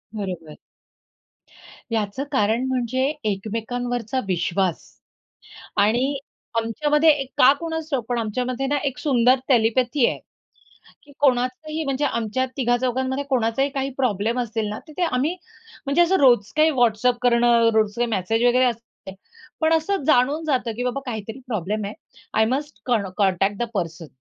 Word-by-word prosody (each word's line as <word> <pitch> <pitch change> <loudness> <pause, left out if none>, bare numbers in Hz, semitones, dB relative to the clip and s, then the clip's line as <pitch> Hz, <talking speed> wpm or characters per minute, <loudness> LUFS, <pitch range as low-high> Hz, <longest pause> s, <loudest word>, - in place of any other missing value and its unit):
बरोबर. 180 -7 -6 1.3
याचं 220 +4 -1
कारण 225 -1 +1
म्हणजे 255 0 -1 0.3
एकमेकांवरचा 230 +4 -3
विश्वास. 180 0 0 1.0
आणि 240 +7 +2 0.4
आमच्यामध्ये 295 +7 +2
एक, 280 -3 +2
का 255 - +7
कोणाच 320 -1 -4
ठाउक 255 -5 -1
पण 245 - 0
आमच्यामध्ये 250 +4 -2
ना, 290 +2 +1
एक 270 - -2
सुंदर 255 -3 +3
टेलिपॅथी 240 +2 +3
आहे - - -2 0.8
की 290 - -18
कोणाचही 280 +4 0
म्हणजे 275 0 -1
आमच्या 230 0 -1
तिघा 245 -2 +2
चौघांमध्ये 260 +2 -1
कोणाचाही 255 +1 +1
काही 275 0 -2
प्रॉब्लेम 230 -1 0
असेल 225 -2 -2
ना, 210 - -5
तिथे 310 +4 -3
आम्ही 310 +2 0 0.5
म्हणजे 280 +5 +2
असं 345 +2 +4
रोज 240 -7 +4
काही 310 +1 +5
WhatsApp 240 +1 +3
करणं, 235 -1 +4
रोज 215 -2 +2
काही 240 0 0
मेसेज 225 +2 0
वगैरे 250 +1 +4
असते. 230 -5 -5 0.5
पण 320 +1 +3
असं 325 +2 0
जाणून 290 +2 +3
जातं 255 -6 0
की 245 - -3
बाबा 250 +2 -2
काहीतरी 225 0 -5
प्रॉब्लेम 210 -1 -2
आहे. 205 - -5 0.4
आय 220 - +3
मस्ट 285 +5 -3
कण 220 -6 0
कॉन्टॅक्ट 195 0 +1
द 240 - -1
पर्सन. 165 -4 -4
245 Hz, 145 wpm, -23 LUFS, 220-270 Hz, 1.3 s, का